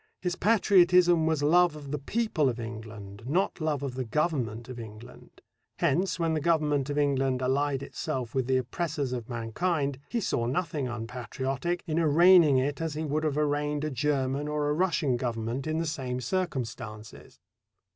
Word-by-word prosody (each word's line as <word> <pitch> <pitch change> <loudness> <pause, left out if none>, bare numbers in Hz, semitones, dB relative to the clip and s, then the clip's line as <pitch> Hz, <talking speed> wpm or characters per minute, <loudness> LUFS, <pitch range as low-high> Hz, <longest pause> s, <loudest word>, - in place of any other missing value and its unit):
His 180 -1 -2
patriotism 180 -5 +4
was 160 -3 +1
love 175 +2 +4
of 145 -2 -9
the 150 - -2
people 170 - 0
of 120 -1 -4
England, 110 -3 -8
not 175 +4 0
love 150 -3 -1
of 135 -3 -3
the 130 0 -3
Government 120 -3 -1
of 125 -2 -8
England. 110 +1 -12 0.4
Hence, 170 +2 +1
when 165 -2 0
the 155 - 0
Government 150 -4 +1
of 145 - -2
England 135 -3 +1
allied 135 +1 0
itself 125 -4 -4
with 130 -2 0
the 130 -1 +3
oppressors 140 +1 -2
of 120 -2 -5
mankind, 140 +5 -1
he 240 - -1
saw 120 - -1
nothing 150 0 -1
unpatriotic 130 +7 -3
in 160 -1 0
arraigning 165 -1 +6
it 140 +4 -1
as 160 -2 -2
he 155 +1 -2
would 155 +1 -1
have 150 -2 0
arraigned 150 0 0
a 155 - -2
German 140 0 0
or 150 -1 -1
a - - +2
Russian 155 -6 +1
Government 120 +2 -3
in 155 0 -1
the 165 - -1
same 130 -5 -3
circumstances. 120 - -5
145 Hz, 170 wpm, -28 LUFS, 125-160 Hz, 0.4 s, arraigning